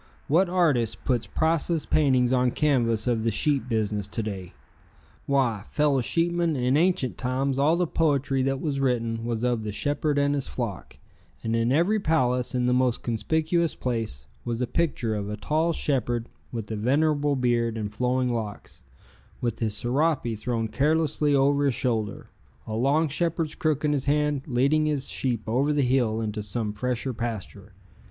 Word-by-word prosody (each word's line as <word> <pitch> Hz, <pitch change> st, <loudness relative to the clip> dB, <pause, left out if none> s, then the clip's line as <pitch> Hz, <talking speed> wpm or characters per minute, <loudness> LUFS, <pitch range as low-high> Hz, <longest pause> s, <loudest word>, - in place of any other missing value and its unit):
What 175 Hz, +5 st, +3 dB
artist 145 Hz, -, +1 dB
puts 125 Hz, -4 st, 0 dB
priceless 160 Hz, 0 st, 0 dB
paintings 130 Hz, -4 st, +3 dB
on 125 Hz, -1 st, +3 dB
canvass 120 Hz, -6 st, +1 dB
of 120 Hz, -2 st, +1 dB
the 115 Hz, -, +1 dB
sheep 130 Hz, +3 st, +1 dB
business 105 Hz, -3 st, -1 dB
to 115 Hz, +3 st, -3 dB
day? 95 Hz, -4 st, -6 dB, 0.7 s
Why, 125 Hz, -7 st, +1 dB
fellow 145 Hz, -3 st, +2 dB
sheepmen, 170 Hz, +3 st, +1 dB
in 125 Hz, 0 st, +1 dB
ancient 165 Hz, -5 st, +1 dB
times 130 Hz, +1 st, -1 dB
all 155 Hz, +4 st, +3 dB
the 180 Hz, -, +2 dB
poetry 140 Hz, -5 st, +1 dB
that 135 Hz, 0 st, 0 dB
was 145 Hz, -3 st, -2 dB
written 115 Hz, -4 st, 0 dB
was 120 Hz, -1 st, -2 dB
of 120 Hz, -2 st, +1 dB
the 105 Hz, -1 st, -4 dB
shepherd 145 Hz, +6 st, -1 dB
and 145 Hz, 0 st, +2 dB
his 140 Hz, -2 st, -1 dB
flock, 70 Hz, -, -5 dB, 0.5 s
and 115 Hz, 0 st, 0 dB
in 115 Hz, +1 st, +1 dB
every 175 Hz, +10 st, +3 dB
palace, 125 Hz, -9 st, +1 dB
in 125 Hz, -1 st, +1 dB
the 125 Hz, -, +2 dB
most 125 Hz, -2 st, +1 dB
conspicuous 160 Hz, +7 st, 0 dB
place, 115 Hz, -, -3 dB, 0.2 s
was 120 Hz, -1 st, -3 dB
a 125 Hz, -, +1 dB
picture 125 Hz, -6 st, -1 dB
of 105 Hz, -1 st, -3 dB
a 105 Hz, -, -4 dB
tall 155 Hz, +8 st, 0 dB
shepherd 120 Hz, -6 st, -1 dB, 0.2 s
with 115 Hz, -3 st, -5 dB
venerable 145 Hz, +6 st, +1 dB
beard 120 Hz, -3 st, +1 dB
and 105 Hz, -1 st, -4 dB
flowing 125 Hz, +1 st, 0 dB
locks, 110 Hz, -3 st, -6 dB, 0.6 s
with 120 Hz, -2 st, -2 dB
his 110 Hz, -2 st, -1 dB
serape 130 Hz, -1 st, 0 dB
thrown 115 Hz, +1 st, -2 dB
carelessly 150 Hz, +3 st, +1 dB
over 140 Hz, +1 st, +3 dB
his 135 Hz, -4 st, +1 dB
shoulder, 110 Hz, -5 st, -2 dB, 0.3 s
a 110 Hz, -, -6 dB
long 140 Hz, +8 st, +2 dB
shepherd's 165 Hz, +1 st, -1 dB
crook 155 Hz, -3 st, 0 dB
in 150 Hz, -, +2 dB
his 140 Hz, -1 st, -2 dB
hand, 150 Hz, -1 st, +1 dB
leading 140 Hz, +4 st, +2 dB
his 145 Hz, -3 st, -1 dB
sheep 120 Hz, -4 st, -1 dB
over 130 Hz, +6 st, +1 dB
the 145 Hz, -1 st, +2 dB
hill 125 Hz, -4 st, +1 dB
into 105 Hz, -1 st, -3 dB
some 105 Hz, +1 st, -3 dB
fresher 125 Hz, +3 st, -2 dB
pasture. 115 Hz, -4 st, -6 dB
130 Hz, 170 wpm, -26 LUFS, 115-150 Hz, 0.7 s, What